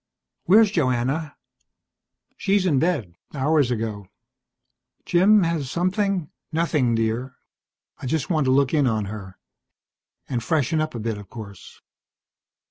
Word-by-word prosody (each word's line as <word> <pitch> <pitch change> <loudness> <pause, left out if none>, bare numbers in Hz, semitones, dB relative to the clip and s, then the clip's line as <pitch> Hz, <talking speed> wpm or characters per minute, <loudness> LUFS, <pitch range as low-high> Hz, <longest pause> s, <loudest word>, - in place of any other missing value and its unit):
"Where's 210 +3 +6
Joanna?" 140 - 0 1.0
"She's 195 -1 +1
in 150 -7 +3
bed. 145 - -1 0.2
Hours 145 -1 +2
ago. 110 -4 -3 1.0
Jim, 195 +3 +5
has 165 -5 -1
something 185 0 -1
?" - - -58
"Nothing, 150 -7 +1
dear. 115 +3 -2 0.6
I - - -6
just 155 +3 -1
want 155 -5 +1
to 130 - +2
look 135 +1 +3
in 145 -4 +3
on 110 -3 0
her. 100 -2 -8 0.9
And 120 -3 -2
freshen 155 +4 +1
up 155 -4 -3
a - - -4
bit, 110 -1 -3
of 100 -2 -12
course." 100 -4 -11
140 Hz, 130 wpm, -23 LUFS, 115-170 Hz, 1.0 s, Where's